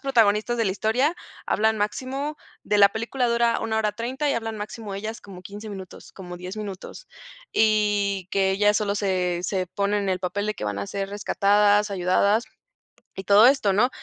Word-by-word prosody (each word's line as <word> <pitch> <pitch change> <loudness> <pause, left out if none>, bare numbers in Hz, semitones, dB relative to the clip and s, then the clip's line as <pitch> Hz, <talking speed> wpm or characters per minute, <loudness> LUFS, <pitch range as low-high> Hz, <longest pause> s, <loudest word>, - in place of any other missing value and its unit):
protagonistas 230 -3 +2
de 230 - +1
la 190 - +1
historia, 245 - +1 0.3
hablan 220 +1 +1
máximo, 265 +8 -3 0.3
de". 210 - +1
La 200 -1 +8
película 230 +4 -2
dura 235 0 +2
1 225 -1 -2
hora 210 -1 0
30 255 +7 -3
y - - +2
hablan 225 -1 -3
máximo 210 0 -7
ellas 215 +3 -5
como 190 -3 -11
15 205 +3 -9
minutos, 190 -2 -10
como 180 -2 -9
10 180 +3 -8
minutos. 205 - -8 0.5
Y 205 -3 +2
que 195 -1 +2
ellas 205 +2 +3
solo 205 -1 -1
se 180 -3 0
se 185 -1 -2
ponen 200 +2 -1
en - - -2
el 185 -1 0
papel 200 +3 -2
de 215 - -1
que - - -6
van 100 -1 -3
a 100 - -4
ser 195 -1 -3
rescatadas, 205 0 +2
ayudadas 200 +4 +2 0.7
y 190 - -7
todo 205 +2 +7
esto, 260 -7 +3
¿no? 225 +6 +3
205 Hz, 190 wpm, -24 LUFS, 195-225 Hz, 0.7 s, La